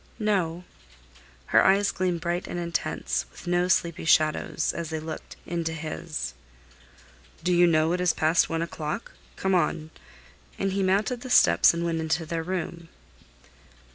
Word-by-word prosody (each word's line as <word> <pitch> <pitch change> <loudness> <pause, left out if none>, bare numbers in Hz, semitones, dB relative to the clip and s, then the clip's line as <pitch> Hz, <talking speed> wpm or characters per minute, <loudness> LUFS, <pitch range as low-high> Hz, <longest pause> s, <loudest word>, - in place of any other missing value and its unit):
"No." 180 -5 0 0.8
Her - - +4
eyes 200 +1 +4
gleamed 180 -2 -1
bright 175 +1 -2
and - - -5
intense, 170 -1 -2
with - - -13
no 175 0 +1
sleepy 170 -3 +1
shadows, 155 0 +2
as 170 -2 -4
they 160 -1 -3
looked 160 0 -7
into 165 -1 -2
his. 155 0 -5 1.1
"Do 180 +1 +2
you 175 0 +5
know 160 0 +3
it 180 - -1
is 180 -2 +3
past 160 +2 +2
one 165 0 -1
o'clock? 170 +5 -5 0.2
Come 190 0 0
on," 160 -2 0 0.7
and 195 - -1
he 195 +1 -1
mounted 205 +6 +1
the 255 - -7
steps - - +6
and 170 0 -3
went 165 -1 -1
into 160 +1 -1
their 165 +1 -3
room. 170 -1 -4
170 Hz, 155 wpm, -26 LUFS, 160-180 Hz, 1.1 s, steps